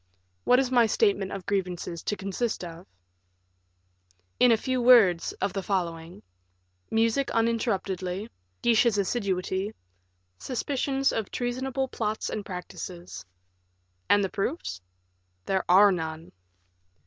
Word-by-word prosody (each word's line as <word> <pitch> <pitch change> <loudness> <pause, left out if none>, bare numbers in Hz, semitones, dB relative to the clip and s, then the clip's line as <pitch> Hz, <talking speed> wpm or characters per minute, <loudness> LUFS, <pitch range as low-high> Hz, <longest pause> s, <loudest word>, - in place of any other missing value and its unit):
"What 250 - +5
is 260 -1 +1
my 240 -3 +5
statement 395 - +1
of 195 -3 -6
grievances 180 -3 -2
to 210 - 0
consist 200 +3 -3
of?" 170 +1 -9 1.5
"In 250 - +6
a 225 - +5
few 255 +2 -1
words, 225 -9 +6
of 200 -1 -2
the 195 - -2
following: 175 -3 -3 0.7
music 230 +4 +1
uninterruptedly; 200 -4 -1 0.4
Guiche's 235 -2 +4
assiduity; 195 -1 -1 0.6
suspicions 270 +1 -1
of 220 -3 -3
treasonable 260 +2 -2
plots 220 -3 -3
and 210 - -3
practices." 180 - -8 0.8
"And 205 - +5
the 195 - -1
proofs?" 195 - -3 0.6
"There 190 -1 0
are 200 +3 +7
none." 160 -2 -4
205 Hz, 115 wpm, -27 LUFS, 185-240 Hz, 1.5 s, are